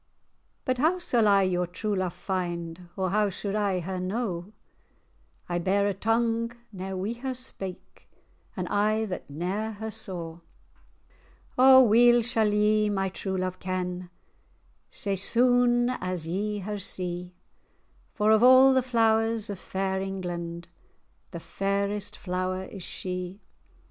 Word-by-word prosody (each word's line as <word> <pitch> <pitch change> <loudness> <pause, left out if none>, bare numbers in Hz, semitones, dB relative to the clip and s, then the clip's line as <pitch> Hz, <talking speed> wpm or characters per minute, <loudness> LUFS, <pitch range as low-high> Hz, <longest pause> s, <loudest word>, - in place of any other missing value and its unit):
"But 255 -1 0
how 320 +6 +3
sall 240 -11 +2
I 200 -1 +5
your 180 -1 0
true 205 +4 -3
love 185 -2 -2
find, 175 -2 -4
Or 185 -2 0
how 210 0 +2
suld 195 +1 -4
I 200 -3 0
her 185 +2 -4
know? 185 -1 -3 1.0
I 175 0 -1
bear 195 +3 +1
a 205 - +1
tongue 230 +2 0 0.2
ne'er 190 0 -5
wi' 200 +5 -2
her 260 0 -3
spake, 195 -7 -8 0.5
An 180 -1 -2
eye 215 +2 +1
that 185 -7 -6
ne'er 190 +9 -3
her 220 +1 -6
saw." 170 -5 -6 1.2
"O 260 0 +8
weel 240 +1 +5
sall 220 -2 +1
ye 210 0 +3
my 195 -1 0
true 190 0 -4
love 185 0 -3
ken, 180 -1 -3 0.8
Sae 200 -5 -2
sune[#] 245 +4 +3
as 185 -3 -3
ye 205 +5 -2
her 205 +2 -4
see; 180 -1 -3 0.8
For, 215 0 +3
of 220 0 +5
a' 260 +2 +8
the 260 - +4
flowers 225 -3 +1
of 195 - -6
fair 190 0 -2
England, 175 -3 -5 0.6
The 170 - -7
fairest 200 +3 -2
flower 185 0 -2
is 190 0 -9
she. 180 +2 -5
195 Hz, 140 wpm, -27 LUFS, 185-220 Hz, 1.2 s, O